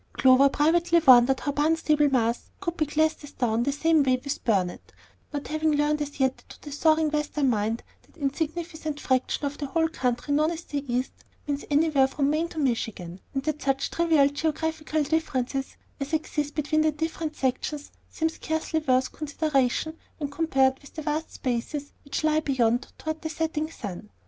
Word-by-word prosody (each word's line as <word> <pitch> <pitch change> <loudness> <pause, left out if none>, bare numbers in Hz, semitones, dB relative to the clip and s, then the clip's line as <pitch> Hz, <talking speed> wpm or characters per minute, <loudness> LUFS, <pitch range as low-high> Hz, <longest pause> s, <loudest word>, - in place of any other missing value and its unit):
Clover 265 +1 +6
privately 335 +4 +3
wondered 255 0 +7
how 285 - -1
Barnstable, 300 0 +2
Mass., 235 -3 0
could 345 -3 -3
be 310 -3 0
classed 310 +1 +1
as 290 - -11
"down" 230 -2 0
the 275 +4 +1
same 315 +2 +3
way 255 -2 +2
with 280 -1 -4
Burnet, 190 -6 0 0.4
not 290 -1 -4
having 310 0 +1
learned 295 +1 +1
as 290 -1 -5
yet 265 -1 +2
that - - -23
to - - -13
the 295 - -8
soaring 315 +1 +3
Western 300 -3 +1
mind 220 +1 -1 0.2
that - - -26
insignificant 315 +1 -3
fraction 260 +2 0
of 285 +1 -4
the 285 - -3
whole 325 +3 +1
country 255 -2 -1
known 305 +2 +3
as 335 0 -5
"the 285 -3 -4
East," 250 +2 0 0.3
means 285 -1 -3
anywhere 290 -2 +4
from 280 +1 0
Maine 320 +2 +1
to 335 - -12
Michigan, 225 - -2 0.2
and 270 - -1
that 305 0 -2
such 270 0 0
trivial 325 -4 +4
geographical 315 +1 -1
differences 270 -3 -1 0.2
as 275 +3 -5
exist 295 -2 -1
between 310 0 +1
the 310 0 +3
different 320 0 -3
sections 280 +3 -2 0.2
seem 320 - 0
scarcely 320 0 -2
worth 260 -4 +1
consideration 300 -1 0 0.2
when 290 -2 -4
compared 270 -4 +2
with 280 - -16
the 310 - -5
vast 305 +1 -2
spaces 265 +4 -3
which 280 +2 -3
lie 310 0 +3
beyond 245 -5 +1
toward 315 0 -4
the 315 - -3
setting 315 -1 -2
sun. 205 - -7
295 Hz, 180 wpm, -26 LUFS, 265-315 Hz, 0.4 s, wondered